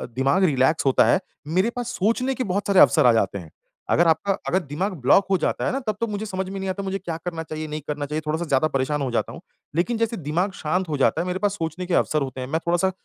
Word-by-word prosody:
दिमाग 135 +8 +2
रिलैक्स 145 -2 +2
होता 135 - +4
है, - - +4 0.3
मेरे 185 +8 +2
पास 245 -1 -3
सोचने 230 +7 +1
के 255 - -2
बहुत 200 +2 -1
सारे 195 -2 +4
अवसर 155 - +6
आ 120 - +7
जाते 110 -3 +1
हैं। 85 - -11 0.4
अगर 175 - +4
आपका 180 +5 +2
अगर 185 - +2
दिमाग 175 +6 -3
ब्लॉक 165 +10 +5
हो 190 - +4
जाता - - 0
है - - +1
ना 270 - -1
तब 215 - 0
तो 230 - 0
मुझे 210 0 -4
समझ 190 -2 -4
में 195 0 -5
नहीं 190 - -3
आता 195 +1 -3
मुझे 195 0 -2
क्या 170 -4 -5
करना 165 -2 -3
चाहिए 155 0 -6
नहीं 155 0 -5
करना 150 -1 -3
चाहिए 150 +2 -3
थोड़ा-सा 160 +3 -1
ज़्यादा 140 +1 +2
परेशान 140 +1 -1
हो 130 - -2
जाता 120 - -1
हूँ। - - -10 0.3
लेकिन 205 +8 +1
जैसे 230 0 -1
दिमाग 170 +5 -1
शांत 180 +3 -1
हो 150 - -1
जाता 140 +4 +2
है 175 - -3
मेरे 180 +1 -2
पास 205 -1 +1
सोचने 165 +1 -4
के 180 - -3
अवसर 155 -2 +2
होते 130 -1 -4
हैं, 125 - -4
मैं 160 +4 -1
थोड़ा-सा 175 +2 +2
170 Hz, 270 wpm, -23 LUFS, 150-195 Hz, 0.4 s, आ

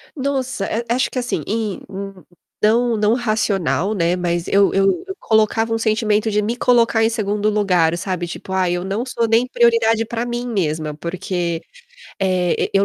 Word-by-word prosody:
Nossa, 265 -6 -2
eh, 230 +4 -2
acho 250 +2 +1
que 255 - -2
assim, 245 0 -2
em 215 -2 -2
hum, 195 0 -6
hum, - - -19 0.4
não 230 +2 +3
não 210 +1 +2
racional, 200 - 0
né, 175 -3 +1
mas 175 -1 -2
eu 200 0 +3
eu 195 0 +3 0.2
eu 385 - -5
colocava 220 +1 +1
um - - +1
sentimento 220 -1 +1
de 210 0 +1
me 220 +3 -2
colocar 235 -2 +3
em 225 - +3
segundo 210 -2 -1
lugar, 180 -6 +2
sabe, 180 -1 -3
tipo: 180 - -8
"Ai, 185 -2 +1
eu 175 0 -2
não 200 +6 -2
sou 235 -2 -1
nem 225 +3 +3
prioridade 230 -2 +3
pra 230 +1 -3
mim 240 0 -3
mesma". 155 -8 -1
Porque, 175 -1 -3 0.6
eh, 185 -2 +1 0.2
eu 195 0 +4
210 Hz, 180 wpm, -19 LUFS, 185-230 Hz, 0.6 s, eu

